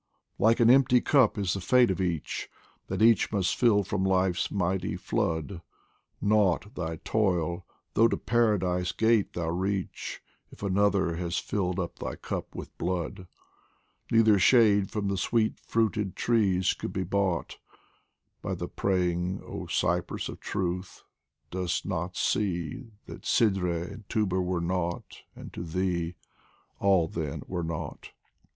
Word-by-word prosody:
Like 115 +3 +4
an 120 0 +6
empty 125 -1 +5
cup 130 -4 +3
is 95 -4 0
the 95 - -3
fate 125 +2 +4
of 95 - -2
each, 85 -4 -2 0.4
That - - -1
each 115 -3 +4
must 100 -4 +1
fill 110 -5 +4
from 95 0 -2
Life's 95 -1 +1
mighty 95 -1 -1
flood; 80 +2 -2 0.6
Nought 100 -2 +2
thy 80 -2 -3
toil, 90 -4 0 0.3
though 115 - +5
to - - -1
Paradise 95 -7 +1
gate 110 -2 +2
thou 85 -2 -2
reach, 95 +2 -3 0.3
If - - -13
Another 100 -3 +2
has 85 0 -2
filled 95 -2 -1
up 85 -2 -4
thy - - -4
cup - - -6
with - - -8
blood; 90 +1 -3 0.8
Neither 110 -3 +5
shade 105 -2 +5
from 105 -2 -2
the 100 0 -1
sweet 110 +2 0
fruited 105 -4 -1
trees 100 -6 +2
could - - -6
be 95 - -1
bought 95 -2 -1 0.8
By - - -3
thy - - -4
praying 90 -1 -1
oh - - -6
Cypress - - -1
of - - -8
Truth, 90 0 -4 0.5
dost 90 -1 -2
not 90 -2 -3
see 90 - -1 0.2
That - - -10
Sidreh 90 -6 +1
and 105 -1 -13
Tuba 95 -4 +1
were 90 -1 -1
nought, 85 0 -3
and - - -10
to - - -6
thee 85 0 -2 0.6
All 95 -4 +3
then 80 -3 -4
were 90 -2 -3
nought 80 -1 -6
95 Hz, 145 wpm, -28 LUFS, 90-105 Hz, 0.8 s, an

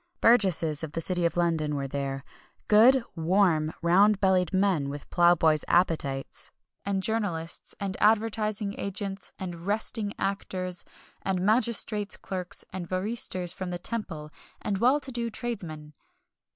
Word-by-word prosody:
Burgesses 180 -10 +3
of 155 -2 -5
the - - -2
City 175 +1 0
of 170 - -6
London 160 -4 +1
were 140 -1 -2
there 135 0 -3 0.4
good, 235 +4 +6
"warm," 165 -2 +2
round 195 +4 +5
bellied 185 -3 +2
men, 190 -7 +1
with 145 0 -7
plough 175 0 +5
boys' 155 -2 +3
appetites 155 -6 0 0.3
and 195 -1 -1
journalists, 190 -7 -1
and 195 -1 -3
advertising 215 -1 +1
agents, 195 0 -3
and 175 -1 -7
"resting" 210 0 0
actors, 185 -2 -2 0.4
and 190 -2 -1
magistrates' 215 -2 +1
clerks, 185 -2 -5
and 180 -2 -5
barristers 185 -2 -2
from 185 -1 -5
the 175 - -3
Temple, 170 -7 -4 0.3
and 200 -2 -2
well 255 +6 +4
to 270 -2 -7
do 235 -1 -2
tradesmen. 170 -11 -6
185 Hz, 140 wpm, -27 LUFS, 165-210 Hz, 0.4 s, good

